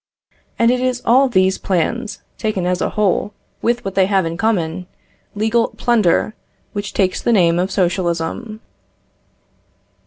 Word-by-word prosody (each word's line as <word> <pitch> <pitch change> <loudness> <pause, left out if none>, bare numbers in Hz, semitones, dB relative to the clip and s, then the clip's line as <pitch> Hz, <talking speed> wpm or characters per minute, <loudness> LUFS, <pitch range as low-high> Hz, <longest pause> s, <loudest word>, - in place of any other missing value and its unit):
And 230 +1 +4
it 250 - +1
is 250 -1 -1
all 260 +3 +4
these 190 -4 +2
plans, 210 +5 -2 0.2
taken 210 -5 -1
as 180 0 0
a - - 0
whole, 205 0 0 0.3
with 240 -1 0
what 195 - -3
they 190 -1 +3
have 195 -3 +2
in 165 0 -3
common, 180 -4 -1 0.5
legal, 225 +3 +1
plunder, 220 -3 +2 0.4
which 205 -1 -4
takes 185 -2 +1
the - - +1
name 175 -5 +3
of 185 +2 0
socialism. 185 +4 -2
200 Hz, 145 wpm, -18 LUFS, 180-230 Hz, 0.5 s, And